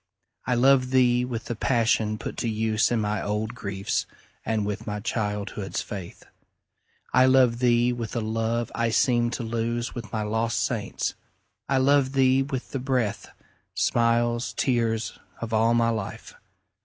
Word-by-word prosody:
I 125 Hz, -, +2 dB
love 130 Hz, +1 st, +4 dB
thee 125 Hz, -1 st, +3 dB
with 120 Hz, -2 st, -4 dB
the 120 Hz, -, -3 dB
passion 110 Hz, -2 st, +1 dB
put -, -, -6 dB
to 115 Hz, -, -1 dB
use 110 Hz, 0 st, +1 dB
In 120 Hz, -, +1 dB
my 105 Hz, -1 st, -1 dB
old 105 Hz, +2 st, -2 dB
griefs, 100 Hz, -5 st, -3 dB, 0.4 s
and 110 Hz, -2 st, -1 dB
with 105 Hz, 0 st, -4 dB
my 105 Hz, 0 st, -3 dB
childhood's 105 Hz, -2 st, -3 dB
faith. 95 Hz, -4 st, -8 dB, 0.9 s
I 130 Hz, 0 st, +6 dB
love 130 Hz, -3 st, +4 dB
thee 120 Hz, 0 st, +3 dB
with 115 Hz, -2 st, -5 dB
a -, -, +1 dB
love 115 Hz, +1 st, -1 dB
I 115 Hz, 0 st, 0 dB
seemed 120 Hz, 0 st, +2 dB
to 120 Hz, -, -3 dB
lose 115 Hz, +1 st, -2 dB
With 115 Hz, -5 st, -7 dB
my 110 Hz, -1 st, -2 dB
lost 110 Hz, +2 st, 0 dB
saints,—I 135 Hz, -, -4 dB
love 135 Hz, 0 st, +3 dB
thee 135 Hz, 0 st, +4 dB
with 135 Hz, -2 st, -4 dB
the 135 Hz, -, -2 dB
breath, 125 Hz, -5 st, -1 dB, 0.5 s
Smiles, 120 Hz, +1 st, +1 dB
tears, 115 Hz, -3 st, 0 dB, 0.2 s
of 115 Hz, -1 st, -5 dB
all 115 Hz, +2 st, +3 dB
my 115 Hz, 0 st, +3 dB
life! 110 Hz, -4 st, -5 dB
115 Hz, 155 wpm, -25 LUFS, 110-125 Hz, 0.9 s, I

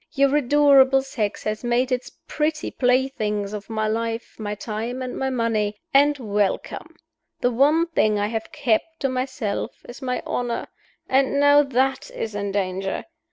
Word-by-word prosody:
Your 275 Hz, -1 st, +3 dB
adorable 275 Hz, -1 st, +5 dB
sex 215 Hz, -6 st, -3 dB
has 215 Hz, +2 st, -3 dB
made 245 Hz, +2 st, +1 dB
its 250 Hz, 0 st, -1 dB, 0.2 s
pretty 305 Hz, 0 st, -1 dB
playthings 245 Hz, -6 st, 0 dB
of 210 Hz, 0 st, -7 dB
my 215 Hz, -1 st, -1 dB
life, 230 Hz, +1 st, -2 dB
my 210 Hz, -1 st, -3 dB
time, 225 Hz, +4 st, -4 dB
and 255 Hz, -, -5 dB
my 265 Hz, -, -1 dB
money 225 Hz, -4 st, 0 dB, 0.2 s
and 290 Hz, +1 st, +5 dB
welcome! 210 Hz, -5 st, -2 dB, 0.5 s
The 245 Hz, -, +2 dB
one 295 Hz, +7 st, +4 dB
thing 215 Hz, -11 st, +1 dB
I 205 Hz, -, +1 dB
have 225 Hz, +5 st, -4 dB
kept 300 Hz, +2 st, 0 dB
to 270 Hz, -, +1 dB
myself 255 Hz, -4 st, -3 dB
is 240 Hz, -, -10 dB
my 250 Hz, -1 st, -2 dB
honor. 240 Hz, -1 st, -2 dB, 0.4 s
And 270 Hz, +1 st, +2 dB
now 285 Hz, 0 st, +6 dB
that 270 Hz, -1 st, 0 dB
is 220 Hz, -, -4 dB
in 200 Hz, -1 st, -3 dB
danger. 190 Hz, -1 st, -2 dB
245 Hz, 160 wpm, -23 LUFS, 215-270 Hz, 0.5 s, now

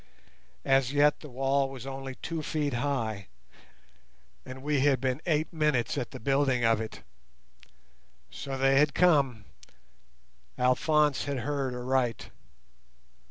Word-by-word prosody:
As 135 Hz, -1 st, +3 dB
yet 145 Hz, +1 st, +3 dB
the 150 Hz, -, -11 dB
wall 135 Hz, +2 st, 0 dB
was 130 Hz, -2 st, -9 dB
only 135 Hz, -1 st, -6 dB
two 165 Hz, +3 st, -5 dB
feet 150 Hz, -2 st, -2 dB
high, 115 Hz, -6 st, -2 dB, 1.2 s
and 130 Hz, +1 st, -9 dB
we 145 Hz, -1 st, +1 dB
had 135 Hz, -1 st, +3 dB
been 130 Hz, +2 st, -1 dB
eight 155 Hz, -1 st, 0 dB
minutes 150 Hz, -7 st, +1 dB
at 120 Hz, -, -3 dB
the -, -, -9 dB
building 135 Hz, -1 st, +1 dB
of 115 Hz, -1 st, +3 dB
it. 110 Hz, -, -8 dB, 1.3 s
So 135 Hz, -1 st, -5 dB
they 135 Hz, +1 st, +4 dB
had 150 Hz, 0 st, +2 dB
come. 140 Hz, -, +3 dB, 1.1 s
Alphonse 145 Hz, +3 st, +2 dB
had 140 Hz, -3 st, -3 dB
heard 135 Hz, -1 st, -2 dB
aright. 125 Hz, -1 st, -1 dB
135 Hz, 125 wpm, -28 LUFS, 125-145 Hz, 1.3 s, they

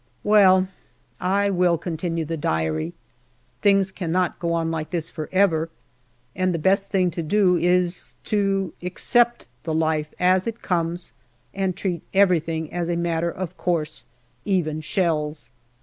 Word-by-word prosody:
Well, 190 Hz, -3 st, +5 dB, 0.5 s
I 200 Hz, +2 st, +1 dB
will 180 Hz, -2 st, +3 dB
continue 165 Hz, 0 st, -3 dB
the 165 Hz, +2 st, -3 dB
Diary: 80 Hz, -, -1 dB, 0.7 s
things 195 Hz, -2 st, +3 dB
cannot 180 Hz, -1 st, -1 dB
go 170 Hz, -1 st, -1 dB
on 165 Hz, -1 st, 0 dB
like 160 Hz, -1 st, -3 dB
this 165 Hz, -2 st, -3 dB
for 155 Hz, -2 st, -6 dB
ever, 165 Hz, -4 st, +2 dB, 0.7 s
and 185 Hz, -1 st, +1 dB
the -, -, 0 dB
best 195 Hz, +4 st, +2 dB
thing 185 Hz, -3 st, +2 dB
to 170 Hz, -, -4 dB
do 185 Hz, +2 st, +3 dB
is 180 Hz, 0 st, +1 dB
to 195 Hz, -3 st, 0 dB
accept 240 Hz, +7 st, +1 dB, 0.2 s
the 160 Hz, 0 st, -3 dB
life 155 Hz, -1 st, 0 dB
as 185 Hz, +3 st, +3 dB
it 230 Hz, 0 st, -5 dB
comes 175 Hz, -1 st, -2 dB, 0.4 s
and 190 Hz, -2 st, -1 dB
treat 180 Hz, -4 st, -2 dB
everything 165 Hz, -5 st, +2 dB
as 175 Hz, -1 st, -2 dB
a 170 Hz, -, +1 dB
matter 170 Hz, 0 st, 0 dB
of 180 Hz, 0 st, -5 dB
course 160 Hz, -3 st, -2 dB, 0.4 s
even 155 Hz, -6 st, 0 dB
shells. 155 Hz, -5 st, -1 dB
175 Hz, 145 wpm, -23 LUFS, 160-190 Hz, 0.7 s, Well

